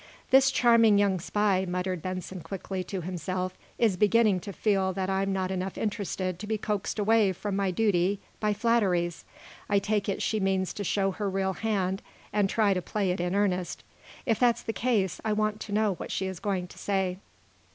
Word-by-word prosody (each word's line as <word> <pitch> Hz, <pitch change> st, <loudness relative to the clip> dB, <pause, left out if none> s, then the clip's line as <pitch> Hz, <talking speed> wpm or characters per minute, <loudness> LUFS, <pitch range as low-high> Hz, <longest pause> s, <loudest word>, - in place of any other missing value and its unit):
"This 265 Hz, 0 st, +7 dB
charming 230 Hz, -5 st, +5 dB
young 200 Hz, -2 st, +2 dB
spy," 195 Hz, +1 st, +1 dB
muttered 180 Hz, -1 st, -2 dB
Benson 185 Hz, 0 st, -5 dB
quickly, 185 Hz, +2 st, -5 dB
to 190 Hz, 0 st, -4 dB
himself, 185 Hz, +1 st, -3 dB, 0.2 s
"is 220 Hz, -6 st, +2 dB
beginning 210 Hz, -1 st, +4 dB
to 200 Hz, +3 st, -7 dB
feel 195 Hz, -2 st, +1 dB
that 190 Hz, +1 st, -2 dB
I'm 195 Hz, +1 st, 0 dB
not 190 Hz, -1 st, -1 dB
enough 185 Hz, 0 st, -3 dB
interested 190 Hz, -4 st, -2 dB
to 210 Hz, -, -6 dB
be 220 Hz, 0 st, 0 dB
coaxed 210 Hz, -1 st, -2 dB
away 210 Hz, -2 st, +3 dB
from 200 Hz, +2 st, -4 dB
my 195 Hz, -1 st, +1 dB
duty 195 Hz, -1 st, +1 dB, 0.2 s
by 210 Hz, -1 st, +1 dB
flatteries. 200 Hz, -6 st, +1 dB, 0.4 s
I 205 Hz, -, +3 dB
take 205 Hz, 0 st, 0 dB
it 195 Hz, -, -1 dB
she 215 Hz, -, 0 dB
means 190 Hz, -1 st, 0 dB
to 205 Hz, -, -4 dB
show 195 Hz, 0 st, +1 dB
her 205 Hz, +1 st, -2 dB
real 190 Hz, 0 st, 0 dB
hand, 195 Hz, -3 st, -1 dB, 0.3 s
and 205 Hz, -2 st, +2 dB
try 210 Hz, -2 st, +3 dB
to 180 Hz, -, -1 dB
play 195 Hz, +1 st, -1 dB
it 180 Hz, -, -2 dB
in 180 Hz, +2 st, -1 dB
earnest. 185 Hz, -3 st, 0 dB, 0.4 s
If 225 Hz, -4 st, +1 dB
that's 240 Hz, -2 st, +3 dB
the 225 Hz, -, -3 dB
case, 210 Hz, -6 st, 0 dB
I 220 Hz, -, +1 dB
want 215 Hz, 0 st, 0 dB
to 210 Hz, -, -7 dB
know 210 Hz, -1 st, +2 dB
what -, -, -7 dB
she 190 Hz, -, -1 dB
is 190 Hz, -3 st, -5 dB
going 190 Hz, -3 st, -1 dB
to -, -, -13 dB
say." 190 Hz, -2 st, -1 dB
195 Hz, 195 wpm, -28 LUFS, 185-210 Hz, 0.4 s, This